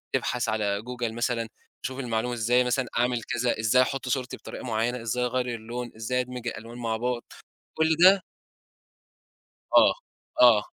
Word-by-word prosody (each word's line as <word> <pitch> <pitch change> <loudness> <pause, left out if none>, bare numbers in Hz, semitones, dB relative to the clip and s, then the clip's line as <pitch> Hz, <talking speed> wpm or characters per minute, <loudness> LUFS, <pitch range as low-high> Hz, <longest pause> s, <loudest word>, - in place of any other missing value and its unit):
تبحث 125 -1 -1
على 105 -2 0
Google 125 0 -4
مثلًا، 115 0 -1 0.4
تشوف 130 +1 -4
المعلومة 120 -1 -1
إزاي 120 +2 +3
مثلًا 125 +1 0
أعمل 120 0 +1
كذا 120 -1 -1
إزاي 110 +3 +4
أحط 135 0 -1
صورتي 130 0 -2
بطريقة - - -9
معيّنة، 120 +1 -1
إزاي 120 +2 -1
أغيّر 125 0 -1
اللون 120 +2 -6
إزاي 115 +3 -1
أدمج 125 -1 -6
الألوان 115 +1 -6
مع 115 -2 -2
بعض، 120 +1 -2 0.5
كلّ 160 0 +3
ده 190 +1 +7 1.5
آه، - - +7 0.5
آه، 115 -4 +7
120 Hz, 150 wpm, -26 LUFS, 115-125 Hz, 1.5 s, ده